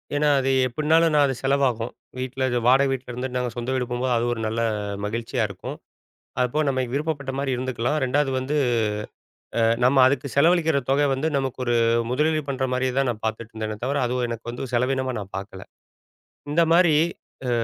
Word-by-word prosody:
ஏன்னா, 150 Hz, +1 st, +2 dB
அது 135 Hz, -, 0 dB, 0.2 s
எப்படின்னாலும் 160 Hz, +5 st, +2 dB
நான் 145 Hz, -, +5 dB
அது 135 Hz, -, -2 dB
செலவாகும். 135 Hz, -4 st, +1 dB, 0.3 s
வீட்டுல 130 Hz, +1 st, -3 dB, 0.2 s
வாடக 135 Hz, +2 st, +5 dB
வீட்டுல 130 Hz, -1 st, -4 dB
இருந்து 125 Hz, +2 st, -3 dB
நாங்க 125 Hz, -1 st, 0 dB
சொந்த 120 Hz, +1 st, -3 dB
வீடு 130 Hz, -1 st, 0 dB
போம்போது. 125 Hz, +1 st, 0 dB
அது 115 Hz, -, 0 dB
ஒரு 115 Hz, -, -6 dB
நல்ல 115 Hz, +2 st, -1 dB, 0.4 s
மகிழ்ச்சியா 115 Hz, +3 st, -2 dB
இருக்கும். 95 Hz, -2 st, -7 dB, 0.6 s
அதுப்போக 125 Hz, +5 st, +1 dB
நம்ம 130 Hz, -1 st, 0 dB
விருப்பப்பட்ட 140 Hz, -2 st, -2 dB
மாதிரி 140 Hz, -1 st, -1 dB
இருந்துக்கலாம். 130 Hz, +3 st, -1 dB
2வது 135 Hz, +2 st, +1 dB
வந்து 130 Hz, +3 st, -3 dB, 1.0 s
அ -, -, +3 dB, 0.2 s
நம்ம 130 Hz, +3 st, +4 dB
அதுக்கு 135 Hz, +1 st, +1 dB
செலவழிக்கிற 160 Hz, +1 st, +4 dB
தொக 140 Hz, +2 st, +3 dB
வந்து 135 Hz, +4 st, 0 dB
நமக்கு 135 Hz, -2 st, -2 dB
ஒரு 120 Hz, -, +1 dB, 0.3 s
முதலீடு 155 Hz, +4 st, +1 dB
பண்ற 135 Hz, -2 st, -2 dB
மாதிரியே 130 Hz, 0 st, 0 dB
தான் 135 Hz, 0 st, +2 dB
நான் 110 Hz, -2 st, -4 dB
பார்த்துட்டு 110 Hz, +1 st, -4 dB
இருந்தனே 110 Hz, -1 st, -4 dB
தவிர. 140 Hz, +3 st, 0 dB
அதுவும் 125 Hz, 0 st, -1 dB
எனக்கு 115 Hz, 0 st, -6 dB
வந்து 120 Hz, +2 st, -5 dB
செலவீனமா 130 Hz, +2 st, +1 dB
நான் 100 Hz, -1 st, -8 dB
பார்க்கல! 95 Hz, -1 st, -8 dB, 0.9 s
இந்த 170 Hz, +3 st, +3 dB
மாதிரி 170 Hz, -2 st, +5 dB, 0.5 s
அ -, -, +1 dB
130 Hz, 175 wpm, -24 LUFS, 120-140 Hz, 1.0 s, நான்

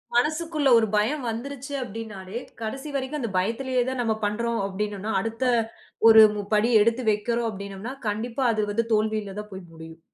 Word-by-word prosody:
மனசுக்குள்ள 305 Hz, +2 st, +1 dB
1 220 Hz, -1 st, +3 dB
பயம் 250 Hz, +7 st, +1 dB
வந்துருச்சு 275 Hz, +4 st, -6 dB
அப்பிடின்னாலே, 215 Hz, -3 st, -7 dB, 0.2 s
கடைசி 270 Hz, +7 st, -5 dB
வரைக்கும் 275 Hz, +3 st, -2 dB
அந்த 230 Hz, -, -2 dB
பயத்திலேயே 245 Hz, +6 st, 0 dB
தான் 260 Hz, -2 st, -2 dB
நம்ம 225 Hz, -2 st, +1 dB
பண்றோம் 235 Hz, +2 st, -1 dB
அப்பிடின்னோன்னா, 205 Hz, +2 st, -3 dB
அடுத்த 225 Hz, +5 st, -3 dB, 0.6 s
1 220 Hz, -1 st, +10 dB
மு 205 Hz, -, -2 dB
படி 215 Hz, +3 st, +3 dB
எடுத்து 230 Hz, +3 st, +2 dB
வெக்கிறோம் 230 Hz, +3 st, -1 dB
அப்பிடீன்னோம்னா, 200 Hz, +4 st, -7 dB
கண்டிப்பா 230 Hz, +5 st, -2 dB
அது 215 Hz, -1 st, 0 dB
வந்து 230 Hz, +2 st, 0 dB
தோல்வியில 215 Hz, -2 st, 0 dB
தான் 210 Hz, -1 st, -9 dB
போய் 190 Hz, -3 st, -9 dB
முடியும். 160 Hz, 0 st, -11 dB
225 Hz, 160 wpm, -25 LUFS, 210-250 Hz, 0.6 s, 1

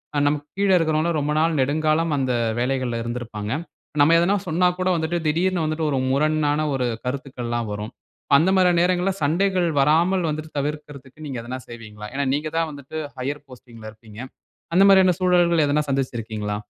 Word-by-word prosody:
அ -, -, +2 dB
நமக்கு 145 Hz, 0 st, -1 dB
கீழ 200 Hz, 0 st, +1 dB
இருக்கிறவங்கலாம் 160 Hz, 0 st, +1 dB
ரொம்ப 145 Hz, +1 st, -1 dB
நாள் 160 Hz, 0 st, +1 dB
நெடுங்காலம் 155 Hz, +3 st, +1 dB
அந்த 130 Hz, -2 st, 0 dB, 0.3 s
வேலைகள்ல 125 Hz, -2 st, -1 dB
இருந்திருப்பாங்க. 115 Hz, -3 st, -5 dB, 0.5 s
நம்ம 150 Hz, +3 st, +5 dB
எதுனா 185 Hz, +4 st, +2 dB
சொன்னா 180 Hz, +2 st, +2 dB
கூட 185 Hz, 0 st, +1 dB
வந்துட்டு, 165 Hz, +1 st, -1 dB
திடீர்னு 175 Hz, +3 st, +1 dB
வந்துட்டு 155 Hz, 0 st, -1 dB
1 135 Hz, -, 0 dB
முரணான 150 Hz, +1 st, +1 dB
1 125 Hz, -2 st, -1 dB, 0.2 s
கருத்துக்கல்லாம் 125 Hz, -3 st, -4 dB
வரும். 105 Hz, +2 st, -6 dB, 0.4 s
அந்த 170 Hz, +6 st, +3 dB
மாரியான 180 Hz, -2 st, +4 dB
நேரங்கள்ல 180 Hz, +2 st, +1 dB
சண்டைகள் 180 Hz, +3 st, +1 dB
வராமல் 165 Hz, +5 st, +3 dB
வந்துட்டு 155 Hz, +1 st, -5 dB
தவிர்க்கறதுக்கு 145 Hz, 0 st, -6 dB
நீங்க 135 Hz, -4 st, -5 dB
எதுனா 125 Hz, +2 st, -6 dB
செய்வீங்களா? 105 Hz, -3 st, -9 dB
ஏன்னா 140 Hz, +1 st, -1 dB
நீங்கதான் 155 Hz, +3 st, -1 dB
வந்துட்டு 145 Hz, +2 st, -9 dB, 0.2 s
ஹையர் 140 Hz, +3 st, -4 dB
போஸ்டிங் 120 Hz, -2 st, -14 dB
ல 110 Hz, -, -7 dB
இருக்கீங்க. 110 Hz, -1 st, -15 dB, 0.6 s
அந்த 190 Hz, -, +6 dB
மாரியான 190 Hz, -2 st, +6 dB
சூழல்கள் 175 Hz, -3 st, +3 dB
எதுனா 145 Hz, +1 st, +2 dB
சந்திச்சிருக்கீங்களா? 115 Hz, -6 st, -3 dB
150 Hz, 160 wpm, -22 LUFS, 130-165 Hz, 0.6 s, அந்த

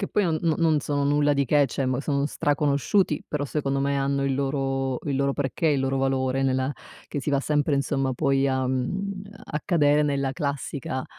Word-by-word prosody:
che 195 Hz, -, -2 dB
poi 210 Hz, -, +1 dB
non 160 Hz, -3 st, +1 dB
no 165 Hz, -2 st, +2 dB
non 160 Hz, -3 st, +2 dB
sono 145 Hz, 0 st, -1 dB
nulla 145 Hz, 0 st, +3 dB
di 140 Hz, 0 st, +2 dB
che, 145 Hz, +2 st, +3 dB
cioè 135 Hz, -, -2 dB
m 130 Hz, -1 st, 0 dB
sono 140 Hz, 0 st, 0 dB
straconosciuti, 145 Hz, -, +1 dB
però 145 Hz, -1 st, -2 dB
secondo 140 Hz, -1 st, -1 dB
me 140 Hz, 0 st, 0 dB
hanno 140 Hz, 0 st, 0 dB
il 135 Hz, -1 st, +1 dB
loro 135 Hz, -1 st, -1 dB
il 140 Hz, -3 st, -1 dB
loro 140 Hz, 0 st, +1 dB
perché, 145 Hz, +3 st, -1 dB
il 145 Hz, -3 st, +2 dB
loro 135 Hz, 0 st, 0 dB
valore 135 Hz, 0 st, 0 dB
nella 130 Hz, +1 st, +1 dB, 0.3 s
che 145 Hz, -, -4 dB
si 150 Hz, -, -5 dB
va 140 Hz, -1 st, +2 dB
sempre 150 Hz, 0 st, +1 dB
insomma, 135 Hz, -1 st, 0 dB
poi 135 Hz, 0 st, +2 dB
a 130 Hz, -1 st, 0 dB
mhmm, 190 Hz, +10 st, -2 dB, 0.2 s
a 150 Hz, -, -4 dB
cadere 150 Hz, -5 st, +3 dB
nella 140 Hz, -2 st, 0 dB
classica, 140 Hz, -2 st, -3 dB
140 Hz, 205 wpm, -25 LUFS, 135-150 Hz, 0.3 s, nulla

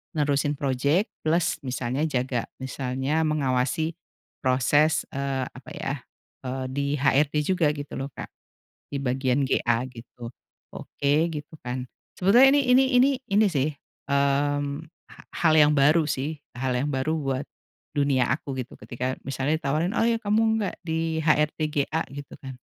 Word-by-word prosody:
nerusin 145 Hz, -1 st, +1 dB
proyek, 140 Hz, -, +1 dB, 0.2 s
plus 170 Hz, +2 st, +2 dB
misalnya 130 Hz, +3 st, -1 dB
jaga, 130 Hz, -4 st, -1 dB, 0.2 s
misalnya 130 Hz, +3 st, -1 dB
mengawasi 150 Hz, +2 st, 0 dB, 0.5 s
proses, 145 Hz, +4 st, +3 dB
eee, 135 Hz, -1 st, -2 dB
apa 130 Hz, -, -13 dB
ya, 135 Hz, -, -3 dB, 0.5 s
eee, 130 Hz, +1 st, -3 dB
di 140 Hz, +2 st, -1 dB, 0.2 s
HRD 145 Hz, +1 st, +3 dB
juga 180 Hz, -1 st, +2 dB
gitu 145 Hz, -1 st, -7 dB
loh 135 Hz, -, -3 dB
Kak, -, -, -7 dB, 0.6 s
di 140 Hz, -, -2 dB
bagian 130 Hz, +1 st, 0 dB
GA 115 Hz, -2 st, +1 dB
gitu, 120 Hz, -1 st, -10 dB, 0.4 s
oke 140 Hz, 0 st, -2 dB, 0.2 s
gitu 150 Hz, 0 st, -7 dB
kan. 125 Hz, +1 st, -4 dB, 0.3 s
Sebetulnya 240 Hz, +9 st, +7 dB
ini 290 Hz, -, +4 dB, 0.4 s
ini 270 Hz, +3 st, +5 dB
ini 215 Hz, -2 st, +3 dB
sih, 145 Hz, -1 st, +1 dB, 0.4 s
mmm, 140 Hz, +1 st, +1 dB, 0.3 s
ha -, -, -16 dB, 0.2 s
hal 160 Hz, -2 st, +5 dB
yang 150 Hz, 0 st, +6 dB
baru 150 Hz, +4 st, +5 dB
sih, 145 Hz, +2 st, -2 dB, 0.2 s
hal 130 Hz, 0 st, -1 dB
yang 140 Hz, -, -1 dB
baru 130 Hz, +4 st, 0 dB
buat 135 Hz, -1 st, -2 dB, 0.5 s
dunia 140 Hz, -3 st, +2 dB
aku 135 Hz, 0 st, -2 dB
gitu 125 Hz, -, -11 dB
ketika 125 Hz, +2 st, -4 dB
misalnya 135 Hz, +3 st, 0 dB
ditawarin, 155 Hz, +4 st, 0 dB
"Oh -, -, +3 dB
ya 230 Hz, -1 st, +1 dB
kamu 210 Hz, +1 st, +2 dB, 0.2 s
nggak 200 Hz, -, -2 dB
di 160 Hz, -1 st, -1 dB
HRD 150 Hz, -1 st, +2 dB
GA?" 155 Hz, +3 st, 0 dB
Gitu 145 Hz, 0 st, -8 dB
kan, 135 Hz, -1 st, -8 dB
140 Hz, 145 wpm, -25 LUFS, 130-155 Hz, 0.6 s, Sebetulnya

